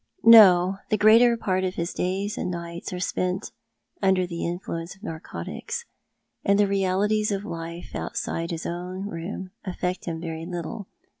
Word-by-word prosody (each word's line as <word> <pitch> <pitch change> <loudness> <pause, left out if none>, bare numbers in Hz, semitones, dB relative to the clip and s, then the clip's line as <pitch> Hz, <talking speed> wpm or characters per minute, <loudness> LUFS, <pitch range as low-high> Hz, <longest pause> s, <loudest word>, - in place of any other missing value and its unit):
"No. 195 -4 +8
The 215 - +2
greater 230 +3 +6
part 185 -4 0
of 185 0 -2
his 170 +1 -2
days 195 +3 -1
and - - -3
nights 170 +1 -5
are 180 - -4
spent 185 +2 -2 0.5
under 190 -1 +3
the 170 -1 -5
influence 170 0 -5
of 195 - -23
narcotics, 160 - -6 0.6
and 200 0 +3
the 205 - +5
realities 200 +2 +1
of 200 0 -2
life 170 -2 -6
outside 165 0 -3
his 165 -1 -4
own 180 +3 -4
room 185 +1 -6
affect 180 -1 -3
him 165 -2 -3
very 165 0 -5
little. 175 +3 -5
185 Hz, 155 wpm, -25 LUFS, 170-200 Hz, 0.6 s, No